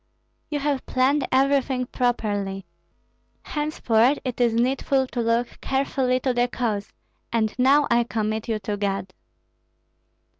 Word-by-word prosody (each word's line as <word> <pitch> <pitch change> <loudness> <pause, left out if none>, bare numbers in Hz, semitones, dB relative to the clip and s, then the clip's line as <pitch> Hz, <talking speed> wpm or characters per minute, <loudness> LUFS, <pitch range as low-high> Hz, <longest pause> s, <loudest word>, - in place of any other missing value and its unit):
"You 300 - -1
have 285 -1 -2
planned 265 +2 +2
everything 265 -1 +2
properly; 205 -6 -1 0.8
henceforth 285 -4 +1
it 250 -1 -3
is 235 -2 +3
needful 265 +2 +1
to 250 -1 -3
look 230 +1 -1
carefully 265 -1 0
to 260 -1 0
the 245 0 +2
cause, 220 -4 -3 0.4
and 220 -2 +1
now 280 +3 +5
I 235 0 +4
commit 220 -1 -2
you 225 -2 0
to 205 +1 -3
God." 195 -2 -2
245 Hz, 125 wpm, -24 LUFS, 220-265 Hz, 0.8 s, now